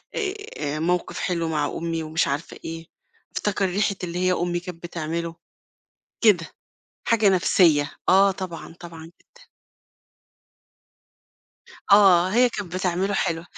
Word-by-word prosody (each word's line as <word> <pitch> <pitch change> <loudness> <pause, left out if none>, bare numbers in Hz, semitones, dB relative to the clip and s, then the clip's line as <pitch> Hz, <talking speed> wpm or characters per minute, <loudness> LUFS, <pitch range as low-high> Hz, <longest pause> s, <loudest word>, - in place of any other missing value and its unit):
آآ 385 - -4
موقف 175 +2 -1
حلو 170 -2 -1
مع 150 -2 0
أمي 165 +1 -3
ومش 160 +2 0
عارفة 140 +3 -4
إيه، 165 0 -6 0.5
افتكر 200 -1 0
ريحة 200 +2 0
اللي 175 0 -3
هي 185 0 +2
أمي 175 0 -1
كانت 175 -1 -10
بتعمله، 170 0 -4 0.9
كده، 190 -7 +4 0.6
حاجة 220 -3 +3
نفسية، 175 -5 +3 0.2
آه 195 +2 +6
طبعًا، 185 -4 -7
طبعًا، 165 -2 -10
جدًا. 475 - -21 2.5
آه، 190 -3 +6
هي 245 +4 +4
كانت 205 -6 -6
بتعمله 185 +2 -1
حلو، 165 -3 -1
175 Hz, 120 wpm, -24 LUFS, 165-195 Hz, 2.5 s, آه